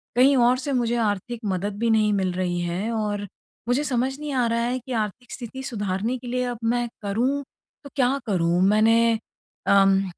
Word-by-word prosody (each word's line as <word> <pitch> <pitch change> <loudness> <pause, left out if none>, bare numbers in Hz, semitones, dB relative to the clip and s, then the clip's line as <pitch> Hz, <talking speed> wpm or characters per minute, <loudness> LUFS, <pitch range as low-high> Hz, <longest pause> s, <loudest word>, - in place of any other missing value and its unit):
कहीं 265 +3 +6
और 245 +1 +4
से 275 +2 -3
मुझे 240 -2 +1
आर्थिक 205 +4 -3
मदद 200 +1 -2
भी 230 0 +1
नहीं 215 -1 +3
मिल 190 -2 0
रही 180 -1 -1
है 175 +6 -2
और 210 -2 -2 0.4
मुझे 250 +4 +2
समझ 265 -1 0
नहीं 300 -1 -4
आ 250 -2 +2
रहा 230 0 0
है 245 +2 -1
कि, 255 +1 -11
आर्थिक 225 +1 -3
स्थिति 260 +1 -7
सुधारने 210 0 -2
के 245 - -10
लिए 250 +1 -1
अब - - -9
मैं 240 +1 +1
करूँ 245 +8 0 0.4
तो 280 - -10
क्या 265 0 +2
करूँ? 175 -3 +1
मैंने 225 +2 +4 0.5
अम, 195 -1 +5
230 Hz, 190 wpm, -24 LUFS, 200-250 Hz, 0.5 s, कहीं